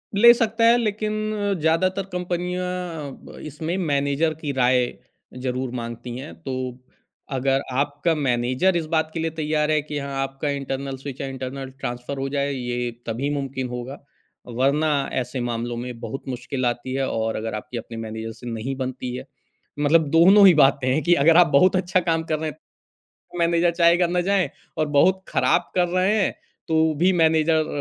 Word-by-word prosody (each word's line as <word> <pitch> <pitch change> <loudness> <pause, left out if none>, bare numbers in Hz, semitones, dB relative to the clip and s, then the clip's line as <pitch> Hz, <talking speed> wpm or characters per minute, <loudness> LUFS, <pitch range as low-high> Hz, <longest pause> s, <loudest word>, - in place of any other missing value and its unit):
ले 235 +4 +8
सकता 230 -1 0
है 235 +1 +6
लेक़िन 215 -2 -1 0.2
अ, 205 -1 -1
ज़्यादातर 185 +5 +1
कंपनियाँ 180 0 -2 0.4
अ, - - -9
ब - - -13
इसमें 155 +4 -4
मैनेजर 145 -1 +1
की 150 - -2
राय 125 -1 +3 0.6
ज़रूर 130 0 -2
माँगती 120 0 -6
हैं 135 +4 -8
तो 135 -4 -5 0.8
अगर 135 0 +1 0.2
आपका 145 +3 0
मैनेजर 130 +5 +1
इस 170 -2 0
बात 160 0 +1
के 165 - -3
लिए 160 0 -1
तैयार 155 -1 0
है 155 -1 +2
कि 150 0 -6
हाँ, 140 -1 -5
आपका 135 +2 -4
इंटर्नल 135 -1 -3
स्विच 135 0 -7
या 135 - -3
इंटर्नल 135 0 -6
ट्रांसफ़र 125 +3 -5
हो 135 - -2
जाए 140 0 -1
ये 125 -2 -3 0.2
तभी 120 +5 -2
मुमकिन 135 -2 -3
होगा। 125 +3 -6 0.5
वरना 135 +6 +1 0.2
ऐसे 130 +1 -2
मामलों 120 0 -3
में 120 0 -6
बहुत 115 +3 -6
मुश्किल 130 +1 -3
आती 120 +1 -2
है 135 0 0
और 110 0 -1
अगर 110 0 -3
आपकी 110 +3 -6
अपनी 115 0 -7
मैनेजर 110 0 -5
से 120 +2 -11
नहीं 115 +4 -3
बनती 130 -1 -4
है - - -7 0.5
मतलब 150 +2 +3
दोनों 190 +5 +7
ही 185 - +8
बातें 135 -3 +4
हैं 155 - +1
कि 175 - +4
अगर 165 +2 +6
आप 175 -1 +7
बहुत 165 +6 +4
अच्छा 185 0 +2
काम 165 0 +1
कर 155 -1 -2
रहे 160 0 -2
हैं 150 - -11 0.6
तो 175 - -13
मैनेजर 170 0 +3
चाहेगा 170 +1 +4
ना 175 +1 0
जाए 195 -2 +2 0.3
और 155 - +2
बहुत 190 +6 +4
ख़राब 175 - +1
कर 180 -1 +2
रहे 185 +4 +2
हैं - - +1 0.4
तो 160 -1 +2
भी 185 +1 +5
मैनेजर 160 -2 +3
145 Hz, 185 wpm, -23 LUFS, 130-170 Hz, 0.8 s, ले